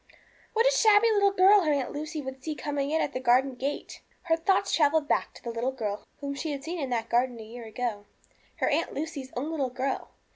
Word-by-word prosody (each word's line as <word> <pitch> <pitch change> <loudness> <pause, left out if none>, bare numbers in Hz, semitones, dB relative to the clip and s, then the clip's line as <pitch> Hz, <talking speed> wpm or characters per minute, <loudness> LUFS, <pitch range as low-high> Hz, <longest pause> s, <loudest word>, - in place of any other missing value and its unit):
What 455 +1 +3
a - - +6
shabby 445 -2 +5
little 405 -2 +4
girl 395 +1 +6
her 310 -4 +1
Aunt 280 -3 0
Lucy 305 +1 -5
would 265 0 -7
see 310 -1 -3
coming 285 -2 -2
in 320 +1 +1
at - - -3
the - - -2
garden 260 +2 +3
gate! 270 +4 -5 0.2
Her 330 -2 +2
thoughts 375 +4 +1
travelled 300 -1 +3
back - - +1
to - - -14
the 235 - -4
little 235 +3 -1
girl 210 -5 -4
whom 280 0 -3
she 295 +2 -3
had 275 -1 -6
seen 340 +2 -4
in 275 -3 -2
that 230 -2 -1
garden 240 0 +1
a - - -7
year 230 +2 -9
ago, 220 -2 -4 0.5
her - - 0
Aunt 320 +3 0
Lucy's 285 -3 -5
own 290 +6 -2
little 280 -5 -1
girl. 260 +2 -3
280 Hz, 230 wpm, -28 LUFS, 250-320 Hz, 0.5 s, a